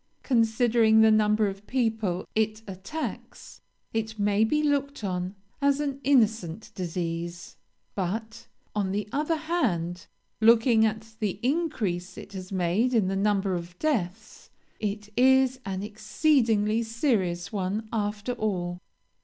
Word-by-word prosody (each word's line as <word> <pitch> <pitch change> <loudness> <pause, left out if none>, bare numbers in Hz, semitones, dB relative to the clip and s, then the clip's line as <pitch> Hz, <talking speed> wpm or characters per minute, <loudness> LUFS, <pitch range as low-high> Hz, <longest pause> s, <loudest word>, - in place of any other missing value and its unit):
Considering 225 -2 +4
the 220 0 +6
number 215 0 +3
of 195 +1 -5
people 220 -8 0
it 220 0 0
attacks, 195 - -7 0.3
it 220 -1 -2
may 205 +1 +2
be 300 +7 +1
looked 280 -3 0
on 185 0 -2 0.3
as 280 0 +3
an 280 -2 -2
innocent 220 - +1
disease; 170 -1 -4 0.4
but, 220 +4 -4 0.3
on 200 -3 -1
the 205 0 -2
other 300 +3 0
hand, 220 - -1 0.3
looking 225 0 +5
at 220 +1 -5
the 205 -3 -2
increase 240 - -1
it 210 -1 -10
has 185 0 -7
made 190 +7 +1
in 200 -5 +3
the 195 - -1
number 195 -1 +1
of 175 0 -5
deaths, 220 - -2 0.3
it 210 0 -3
is 260 +1 +4
an 190 0 -3
exceedingly 220 0 +1
serious 220 - 0
one 205 +2 -2
after 210 +1 -2
all. 180 -6 -2
215 Hz, 130 wpm, -27 LUFS, 190-235 Hz, 0.4 s, the